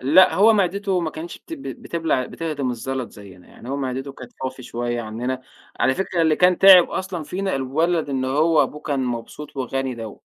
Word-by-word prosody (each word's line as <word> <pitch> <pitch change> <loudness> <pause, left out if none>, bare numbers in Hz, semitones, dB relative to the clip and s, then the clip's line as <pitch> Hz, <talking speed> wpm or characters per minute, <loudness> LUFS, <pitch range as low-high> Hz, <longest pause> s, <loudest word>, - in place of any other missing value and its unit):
لأ 160 +7 +5
هو 210 +6 +6
معدته 200 -1 +1
ما 165 -2 -2
كانش 165 +2 -8
بت - - -14
بت 300 -4 -6
بتبلع 165 - -1
بتهضم 150 -6 -3
الزلط 130 +1 -4
زيّنا، 95 -4 -14
يعني 120 - -13
هو 135 - -2
معدته 135 0 -4
كانت 125 -2 -12
فافي 130 0 -5
شوية 120 0 -3
عنّنا، 120 +4 -4 0.4
على 130 - +3
فكرة 185 -1 -1
اللي 160 -1 +3
كان 180 0 +4
تعب 190 -2 +8
أصلًا 185 -3 -4
فينا 190 +2 -2
الولد 155 +5 0
اللي 130 -2 -1
هو 155 +4 +3
أبوه 150 - -4
كان 140 -3 -2
مبسوط 125 +5 -6
وغني 135 0 -2
دوّه. 115 -3 -8
140 Hz, 190 wpm, -22 LUFS, 130-175 Hz, 0.4 s, تعب